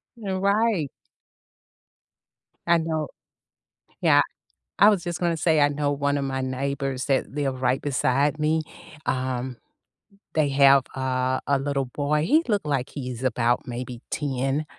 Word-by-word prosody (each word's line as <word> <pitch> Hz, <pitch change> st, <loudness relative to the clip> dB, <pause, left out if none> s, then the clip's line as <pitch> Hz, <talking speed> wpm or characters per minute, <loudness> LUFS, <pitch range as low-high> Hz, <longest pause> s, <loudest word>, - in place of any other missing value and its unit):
You're 195 Hz, -5 st, -3 dB
right. 200 Hz, -, +2 dB, 1.8 s
I 170 Hz, -, +5 dB
know 160 Hz, -2 st, -2 dB, 0.9 s
Yeah. -, -, +5 dB, 0.6 s
I 205 Hz, -, +8 dB
was 195 Hz, -5 st, +1 dB
just 170 Hz, -2 st, -4 dB
gonna 170 Hz, -2 st, 0 dB
say, 160 Hz, -2 st, +3 dB
I 145 Hz, -, +6 dB
know 145 Hz, 0 st, -1 dB
one 145 Hz, 0 st, 0 dB
of 140 Hz, -, -2 dB
my 135 Hz, -1 st, -2 dB
neighbors 135 Hz, 0 st, -2 dB
that 135 Hz, -2 st, +1 dB
live 135 Hz, -2 st, -2 dB
right 125 Hz, +1 st, +1 dB
beside 140 Hz, +1 st, +1 dB
me, 155 Hz, +1 st, +2 dB, 0.4 s
um, 130 Hz, -1 st, -2 dB, 0.8 s
they 155 Hz, -3 st, +2 dB
have, 135 Hz, -1 st, +6 dB
uh, 130 Hz, -1 st, 0 dB
a 140 Hz, -, +3 dB
little 140 Hz, -1 st, -1 dB
boy, 150 Hz, +4 st, -1 dB
he 310 Hz, -, +4 dB
look 205 Hz, -1 st, +2 dB
like 140 Hz, -3 st, -1 dB
he's 130 Hz, -3 st, -6 dB
about 120 Hz, -1 st, +1 dB
maybe 125 Hz, 0 st, -6 dB
10, 135 Hz, +1 st, -1 dB
140 Hz, 140 wpm, -25 LUFS, 130-155 Hz, 1.8 s, I